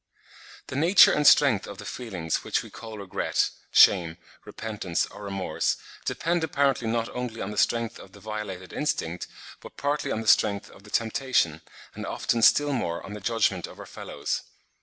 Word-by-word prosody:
The - - -7
nature 170 +7 +7
and 150 -1 +3
strength 135 -9 +5
of 100 - -8
the 105 - -9
feelings 95 -10 -3
which - - -1
we - - -12
call 110 -2 -9
regret, 100 -3 -1 0.2
shame, 85 -4 +5 0.3
repentance 105 -6 -3
or 100 - -13
remorse, 100 -2 -1 0.3
depend 170 0 0
apparently 140 -6 +1
not 115 0 0
only 125 -2 -5
on 100 - -4
the - - -6
strength 115 -1 0
of 95 - -13
the 100 - -13
violated 100 -3 -6
instinct, 90 - -2 0.3
but - - -13
partly 145 +1 -1
on 110 - -1
the 110 - -7
strength 100 -2 +3
of 100 - -17
the - - -13
temptation, 110 - 0 0.3
and - - -6
often 115 - -1
still 145 +5 +5
more 85 -10 -2
on 95 - -8
the 105 - -6
judgment 100 -5 0
of - - -13
our - - -8
fellows. - - -4
110 Hz, 180 wpm, -26 LUFS, 95-125 Hz, 0.3 s, nature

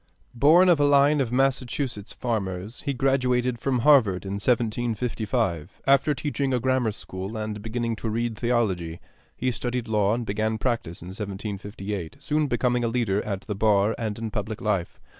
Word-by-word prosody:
Born 155 +9 +6
of 175 -4 +5
a - - +4
line 145 +1 +5
of 120 -3 -1
Massachusetts 125 -4 -1
farmers, 105 -3 -3
he - - +2
graduated 125 -2 +1
from 130 -2 0
Harvard 110 -10 +4
in 95 - -4
1755. 110 -5 -1
After 140 +2 +4
teaching 140 -1 -1
a - - +1
grammar 130 -2 +1
school 95 +1 -6
and 110 -1 -4
beginning 115 +1 -2
to 115 - -3
read 115 +1 -1
theology, 105 -8 0 0.4
he 130 +1 0
studied 120 0 -3
law 105 -1 +2
and 120 -1 -3
began 110 +2 -1
practice 110 -9 -2
in 90 - -8
1758, 100 -2 -5
soon 150 0 0
becoming 120 -1 +1
a - - +1
leader 115 -4 0
at 100 -2 -3
the 105 - -4
bar 105 +1 +3
and 110 -3 -3
in 115 -1 -4
public 110 0 -3
life. 100 -5 -1
115 Hz, 165 wpm, -25 LUFS, 105-125 Hz, 0.4 s, Born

